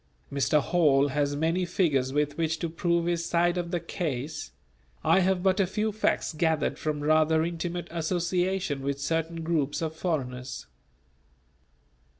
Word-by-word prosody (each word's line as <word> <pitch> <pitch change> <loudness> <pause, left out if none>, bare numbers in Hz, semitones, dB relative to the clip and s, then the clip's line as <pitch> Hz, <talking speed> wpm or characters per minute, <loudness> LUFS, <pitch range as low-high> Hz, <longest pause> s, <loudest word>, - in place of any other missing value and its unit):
Mr. 140 +2 +3
Hall 145 -3 +3
has 145 +1 0
many 165 +5 +1
figures 155 -8 +1
with 145 0 0
which 160 0 0
to 170 - -3
prove 170 +1 0
his 170 -1 0
side 170 +1 +2
of 175 -1 -2
the 175 -1 -1
case; 155 -4 -4 0.5
I - - +5
have 185 -1 +1
but 190 +1 +3
a 195 - +3
few 215 +4 -1
facts 210 -4 0
gathered 160 -1 0
from 150 -2 -2
rather 155 +1 +3
intimate 170 +1 -3
association 175 -1 -1
with 140 0 -2
certain 165 +3 -2
groups 155 -4 0
of 160 -1 -3
foreigners. 130 -7 -3
165 Hz, 150 wpm, -27 LUFS, 145-175 Hz, 0.5 s, I